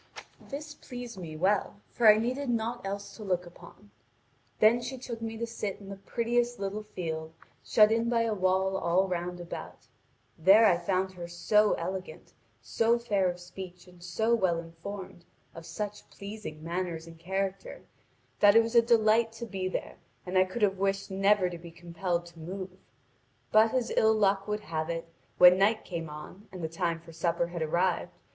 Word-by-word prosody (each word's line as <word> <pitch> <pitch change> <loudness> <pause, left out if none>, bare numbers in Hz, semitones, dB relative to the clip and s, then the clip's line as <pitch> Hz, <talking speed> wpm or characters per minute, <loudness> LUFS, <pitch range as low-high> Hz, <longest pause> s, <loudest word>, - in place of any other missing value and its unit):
This 295 +1 -6
pleased 245 -7 -9
me 160 -3 -7
well, 200 +3 +1
for 235 - +3
I 210 - +8
needed 250 +5 -1
naught 235 +1 -1
else 200 +1 -5
to 220 - -8
look 180 -3 -1
upon. 170 - -15 0.7
Then 230 +3 +5
she 255 +2 -5
took 240 -2 -7
me 225 0 -4
to 235 - -2
sit 210 -3 -4
down - - -15
in 195 - -10
the 200 - -6
prettiest 240 +3 -1
little 200 +2 -3
field, 160 -6 -5 0.3
shut 215 0 +5
in 230 +1 +1
by 230 -1 +2
a 225 -1 0
wall 190 0 +1
all 185 +2 +2
round 180 0 -3
about. 175 -1 -8 0.5
There 195 +7 +7
I 180 -5 +5
found 190 +2 0
her 175 -2 -8
so 210 +5 +3
elegant, 180 -1 -5 0.3
so 225 - +2
fair 200 -6 +1
of 175 0 -5
speech 180 0 -10
and 180 -1 -18
so 220 +6 0
well 185 -7 +2
informed, 175 +2 -8 0.3
of 165 0 -10
such 210 -1 -6
pleasing 200 -7 -8
manners 170 -1 -3
and 165 -1 -13
character, 190 +2 -3 0.6
that 205 0 +6
it 230 - +7
was 225 +1 -4
a 235 - +7
delight 225 -1 +3
to 235 +1 -6
be 190 -4 -3
there, 185 - -4 0.3
and 180 +1 -5
I 185 0 +6
could 200 +5 -4
have 195 -2 +2
wished 195 0 -1
never 195 0 +3
to 175 -1 -6
be 170 0 -10
compelled 170 +1 -3
to 170 -1 -14
move. 185 +3 -6 0.8
But 220 +1 +5
as 245 -2 0
ill 220 0 +4
luck 200 -1 +2
would 210 0 -2
have 155 -3 -3
it, 165 0 -3 0.3
when 180 +1 +8
night 215 +3 +2
came 165 -3 -5
on, 150 +7 -10
and 185 -3 -8
the - - 0
time 165 0 -1
for 165 0 -14
supper 170 +1 0
had 170 -1 -5
arrived. 170 +3 0
190 Hz, 190 wpm, -29 LUFS, 175-220 Hz, 0.8 s, I